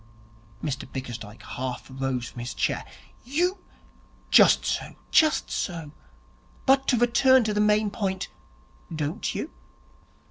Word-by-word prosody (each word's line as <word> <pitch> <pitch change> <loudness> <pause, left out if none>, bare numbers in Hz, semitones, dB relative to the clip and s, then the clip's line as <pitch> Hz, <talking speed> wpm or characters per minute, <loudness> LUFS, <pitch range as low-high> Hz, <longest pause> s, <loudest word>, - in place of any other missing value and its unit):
Mr 135 -3 -4
Bickersdyke 120 -5 -7
half 130 0 -5
rose 130 -2 -3
from 125 - -10
his 120 -2 -5
chair. - - 0 0.4
'You 350 - 0 0.3
' - - -31
'Just - - +6
so, - - -2 0.2
just 310 -2 +4
so, 165 -5 -3 0.7
but 270 0 +4
to 250 - +3
return 245 +2 +5
to 215 -1 -1
the 210 - +2
main 210 0 +3
point 190 -3 -2 0.6
don't 155 -1 -2
you? - - -4
185 Hz, 130 wpm, -26 LUFS, -, 0.7 s, Just